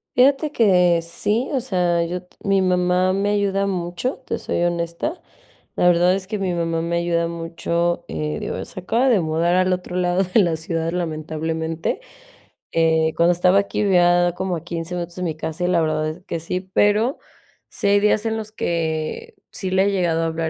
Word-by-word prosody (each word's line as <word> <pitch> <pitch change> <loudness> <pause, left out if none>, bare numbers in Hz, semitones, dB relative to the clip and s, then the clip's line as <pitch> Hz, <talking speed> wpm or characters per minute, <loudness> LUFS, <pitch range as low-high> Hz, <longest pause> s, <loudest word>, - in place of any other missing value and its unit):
Fíjate 280 +4 +3
que 180 - +4
sí. 210 +8 -1
O 275 - +1
sea, 180 -8 +1
yo 180 +2 -4
t 180 - -29
mi 195 -1 +3
mamá 180 0 +2
me 200 +2 0
ayuda 200 -1 +1
mucho, 180 +6 -3
te - - -2
soy 170 - -1
honesta. 170 - -2 0.5
La 180 - +3
verdad, 175 +1 +4
es 195 -1 -4
que 210 0 -3
mi 190 -2 -1
mamá 165 -1 -1
me 170 +1 -2
ayuda 170 -1 0
mucho. 170 +1 -2
Eh, 75 -1 -3
digo, - - -4
es - - -6
se - - -7
acaba 235 +8 +1
de 230 -5 +4
mudar 165 +2 +1
al 185 0 +3
otro 180 0 -4
lado 180 +1 +2
de 185 +4 +2
la 170 -4 +1
ciudad, 165 0 -3
lamentablemente. 160 - -3 0.7
Eh, 160 -1 +2
cuando 170 +1 +4
estaba 180 +2 +3
aquí, 200 +1 -1
vivía 175 -2 +4
como 185 -2 -1
a 160 - -9
15 170 0 -5
minutos, 175 -1 -5
de 180 - -3
mi 165 -3 -2
casa, 160 +3 -3
y - - +1
la 175 -2 +2
verdad 155 -1 0
es 165 +4 -9
que 170 - -3
sí. 180 +3 -3
Pero 210 +6 +3 0.5
sí - - -3
hay 200 0 +5
días 210 +1 +2
en 225 0 0
los 215 -1 -6
que 170 - -3 0.2
sí 190 - -4
le 190 +1 +3
he - - +1
llegado 175 -4 +1
a - - +1
hablar, 160 0 -2
175 Hz, 200 wpm, -21 LUFS, 165-195 Hz, 0.7 s, hay